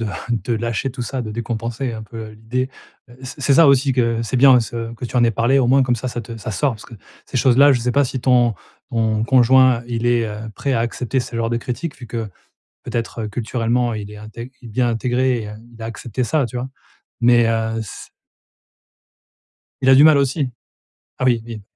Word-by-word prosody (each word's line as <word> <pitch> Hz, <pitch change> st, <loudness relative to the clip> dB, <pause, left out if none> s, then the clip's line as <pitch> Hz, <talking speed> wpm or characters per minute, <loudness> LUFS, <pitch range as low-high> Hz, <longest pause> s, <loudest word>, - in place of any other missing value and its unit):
de 115 Hz, -, -2 dB, 0.3 s
de: 120 Hz, -, -3 dB
«Lâcher 115 Hz, +3 st, -2 dB
tout 125 Hz, 0 st, -6 dB
ça, 125 Hz, +1 st, -3 dB
de 110 Hz, -, -6 dB
décompenser 115 Hz, +2 st, -3 dB
un 110 Hz, -, -6 dB
peu 110 Hz, 0 st, -8 dB
à 110 Hz, -, -11 dB
l'idée». 115 Hz, +4 st, -3 dB, 0.4 s
Heu, 120 Hz, -, -16 dB
c'est 130 Hz, +3 st, -8 dB
c'est 140 Hz, 0 st, +3 dB
ça 165 Hz, -, +7 dB
aussi 140 Hz, 0 st, +4 dB
que 115 Hz, -2 st, +1 dB
c'est 115 Hz, +3 st, -2 dB
bien 130 Hz, -1 st, +7 dB
ce 115 Hz, 0 st, -5 dB
que 125 Hz, -, -8 dB
tu 125 Hz, -, -4 dB
en 120 Hz, -, +4 dB
aies 115 Hz, -, +3 dB
parlé, 120 Hz, +6 st, +2 dB
au 130 Hz, -, +2 dB
moins 135 Hz, +2 st, +4 dB
comme 125 Hz, -2 st, +1 dB
ça, 130 Hz, -, -5 dB
ça 120 Hz, -, -4 dB
te 115 Hz, +1 st, -9 dB
ça 110 Hz, +1 st, -6 dB
sort, 125 Hz, +7 st, +1 dB
parce 105 Hz, -, -13 dB
que 115 Hz, -, -12 dB, 0.3 s
ces -, -, -5 dB
choses-là, 135 Hz, +3 st, +5 dB
je 120 Hz, -, +1 dB
sais 125 Hz, +1 st, -1 dB
pas 145 Hz, 0 st, +3 dB
si 130 Hz, 0 st, -4 dB
ton 120 Hz, -3 st, +3 dB, 0.4 s
ton 110 Hz, -2 st, 0 dB
conjoint, 130 Hz, 0 st, +5 dB
il 120 Hz, -1 st, -3 dB
est, 120 Hz, -1 st, +2 dB
heu, 110 Hz, +1 st, -6 dB
prêt 140 Hz, -, -2 dB
à 115 Hz, -, +1 dB
accepter 120 Hz, +2 st, -2 dB
ce 125 Hz, -, -7 dB
genre 115 Hz, 0 st, 0 dB
de 115 Hz, -, 0 dB
critiques, 130 Hz, +6 st, -5 dB
vu 125 Hz, -, -10 dB
que, 115 Hz, -2 st, -4 dB, 0.6 s
peut-être, 115 Hz, -1 st, -4 dB
heu, 105 Hz, -, -3 dB
culturellement 120 Hz, +1 st, -1 dB
il 105 Hz, -1 st, -6 dB
est -, -, -10 dB
integr 110 Hz, +4 st, -9 dB
il 120 Hz, -, -10 dB
bien 120 Hz, +2 st, +1 dB
intégré 125 Hz, +1 st, 0 dB
et 105 Hz, -, -7 dB
heu, 105 Hz, -, -8 dB, 0.2 s
il 115 Hz, -, -15 dB
a -, -, -4 dB
accepté 115 Hz, +1 st, -5 dB
ça 145 Hz, -1 st, +1 dB
tu 125 Hz, -, -8 dB
vois, 125 Hz, +2 st, -3 dB, 0.5 s
mais 120 Hz, -1 st, +5 dB
heu, 115 Hz, 0 st, -1 dB
s 105 Hz, -, -9 dB, 1.7 s
Il 130 Hz, -, +3 dB
a 135 Hz, -, +8 dB
du 140 Hz, -, +7 dB
mal 155 Hz, -2 st, +7 dB
aussi? 140 Hz, +1 st, 0 dB, 0.7 s
Ah -, -, -1 dB
oui, 120 Hz, -3 st, +3 dB
oui. 115 Hz, -3 st, -8 dB
120 Hz, 230 wpm, -20 LUFS, 115-130 Hz, 1.7 s, a